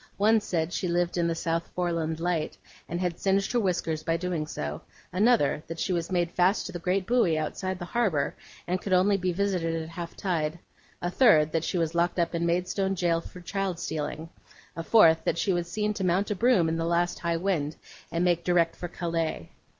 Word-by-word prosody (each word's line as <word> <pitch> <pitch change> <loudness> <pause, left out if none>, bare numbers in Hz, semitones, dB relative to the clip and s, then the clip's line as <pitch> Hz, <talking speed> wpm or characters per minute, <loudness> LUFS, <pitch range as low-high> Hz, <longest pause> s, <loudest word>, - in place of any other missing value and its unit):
One 220 +2 +4
said 175 -4 -2
she 185 - -1
lived 175 0 0
in 170 -1 +1
the 165 - 0
South 165 0 -1
Foreland 165 -3 -1
Light, 170 -2 -1 0.3
and 175 - -2
had 180 -2 -2
singed 195 0 +1
her 245 - +2
whiskers 175 -6 -1
by 165 +1 0
doing 170 -3 -2
so; 75 - -5 0.3
another, 205 - +3
that 165 - -6
she 185 - 0
was 170 -1 -2
made 175 -2 +1
fast 185 +3 +2
to - - -5
the 175 - -5
great 185 +2 0
buoy 215 -8 +2
outside 185 +4 -3
the 175 - -6
harbour, 185 -10 0 0.3
and 180 +2 -1
could 195 - -2
only 190 +3 +4
be 185 -1 0
visited 175 -3 0
at 160 0 -6
half 170 0 -7
tide; 165 -4 -1 0.5
a 175 - -1
third, 160 - +5
that 165 0 0
she 180 - -1
was 165 -1 0
locked 175 +1 +1
up 170 -1 +1
in 170 0 0
Maidstone 180 +3 0
jail 170 -2 +1
for 180 - -11
child 195 0 -2
stealing; 155 +1 -4 0.5
a 165 - -3
fourth, 165 -3 +5
that - - 0
she 190 +2 +1
was 175 -1 -2
seen 210 +2 -1
to 200 - -4
mount 185 +4 +1
a - - 0
broom 205 -5 +3
in 160 0 0
the 165 - -1
last 175 +1 +1
high 170 -1 0
wind, 165 -5 -1 0.4
and 170 +2 0
make 175 -1 +2
direct 170 -2 +2
for 175 - -5
Calais. 165 -2 -3
175 Hz, 215 wpm, -27 LUFS, 165-185 Hz, 0.5 s, third